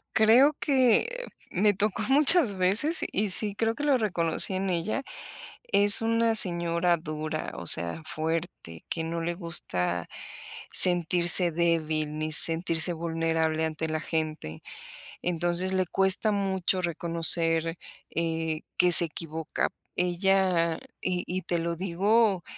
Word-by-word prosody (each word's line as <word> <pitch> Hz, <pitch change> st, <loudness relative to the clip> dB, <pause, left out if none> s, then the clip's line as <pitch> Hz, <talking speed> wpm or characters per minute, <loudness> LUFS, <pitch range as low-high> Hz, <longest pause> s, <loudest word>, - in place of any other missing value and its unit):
Creo 235 Hz, +7 st, +3 dB
que 285 Hz, -, -1 dB, 0.2 s
me 205 Hz, +3 st, 0 dB
tocó 210 Hz, +2 st, -4 dB
muchas 290 Hz, -, +3 dB
veces, 210 Hz, -, +2 dB
y 205 Hz, +1 st, -2 dB
sí, 205 Hz, +2 st, +6 dB
creo 225 Hz, +1 st, -3 dB
que 295 Hz, -, -8 dB
lo 280 Hz, -3 st, +1 dB
reconocí 185 Hz, -4 st, -2 dB
en 190 Hz, 0 st, -4 dB
ella. 180 Hz, +10 st, -4 dB, 0.6 s
Es 205 Hz, -, +5 dB
una 230 Hz, 0 st, -1 dB
señora 170 Hz, -2 st, +1 dB
dura, 155 Hz, 0 st, -7 dB
o 85 Hz, -, -10 dB
sea, 85 Hz, -, +3 dB
fuerte, 160 Hz, -, -6 dB
que 165 Hz, -1 st, -5 dB
no 165 Hz, +1 st, -6 dB
le 170 Hz, +1 st, -4 dB
gusta 90 Hz, -, -3 dB, 0.6 s
sentirse 175 Hz, 0 st, +3 dB
débil, 155 Hz, -2 st, -3 dB
ni 155 Hz, 0 st, -5 dB
sentirse 165 Hz, +1 st, +7 dB
vulnerable 160 Hz, -1 st, -3 dB
ante 160 Hz, 0 st, -6 dB
la 155 Hz, 0 st, -4 dB
gente. 155 Hz, -, -6 dB, 0.6 s
Entonces, 175 Hz, +2 st, -2 dB
le 185 Hz, -1 st, -1 dB
cuesta 195 Hz, +3 st, +1 dB
mucho 190 Hz, -2 st, -3 dB
reconocer, 165 Hz, -1 st, +2 dB, 0.4 s
eh, 160 Hz, -1 st, -4 dB, 0.2 s
que 180 Hz, 0 st, +1 dB
se 170 Hz, -, +9 dB
equivoca. 160 Hz, -1 st, -6 dB, 0.3 s
Ella 180 Hz, -2 st, -1 dB, 0.2 s
y 180 Hz, -1 st, -4 dB
y 185 Hz, +1 st, -5 dB
te 175 Hz, -1 st, -4 dB
lo 170 Hz, 0 st, -5 dB
digo 195 Hz, +2 st, -1 dB
175 Hz, 130 wpm, -24 LUFS, 165-195 Hz, 0.6 s, se